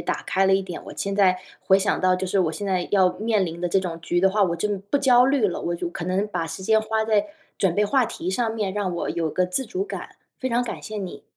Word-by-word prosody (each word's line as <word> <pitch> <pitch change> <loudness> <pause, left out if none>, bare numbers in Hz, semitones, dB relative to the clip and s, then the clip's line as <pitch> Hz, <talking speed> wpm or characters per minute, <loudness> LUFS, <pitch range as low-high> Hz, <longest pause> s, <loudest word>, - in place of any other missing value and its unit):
打 - - -3
开 190 +2 +1
了 190 - +5
一 195 - +1
点， 180 -2 -7
我 - - -8
现 200 0 -2
在 190 -2 +4 0.2
回 190 - +4
想 195 +1 0
到 185 0 +3
就 190 +1 -3
是 190 +2 0
我 165 -4 +1
现 200 +6 -5
在 185 -2 0
要 190 -3 +4
面 215 -2 0
临 170 0 -6
的 175 - -1
这 195 - +3
种 170 -3 -4
局 175 +1 -1
的 190 +1 +4
话， 205 +1 +2
我 170 -3 +1
真 205 +3 -1
不 205 +8 -1
焦 250 -3 +5
虑 270 -5 +3
了， 180 - -3
我 170 - -2
就， 175 0 -3
可 175 - -6
能 190 +3 0
把 180 -5 -3
时 190 - -6
间 220 +3 +3
花 220 0 -1
在 215 +1 +2 0.3
准 185 -3 +2
备 210 - +3
话 255 +5 +3
题 175 - -5
上 225 +3 0
面， 210 -4 -2
让 200 -2 -2
我 175 - -2
有 165 -2 -1
个 180 +4 +1
自 180 +9 0
主 375 +1 -2
感， 425 - -8 0.2
非 260 - -1
常 240 +1 +1
感 240 - -6
谢 215 - -6
你。 190 -3 -6
195 Hz, 305 characters per minute, -24 LUFS, 180-215 Hz, 0.3 s, 了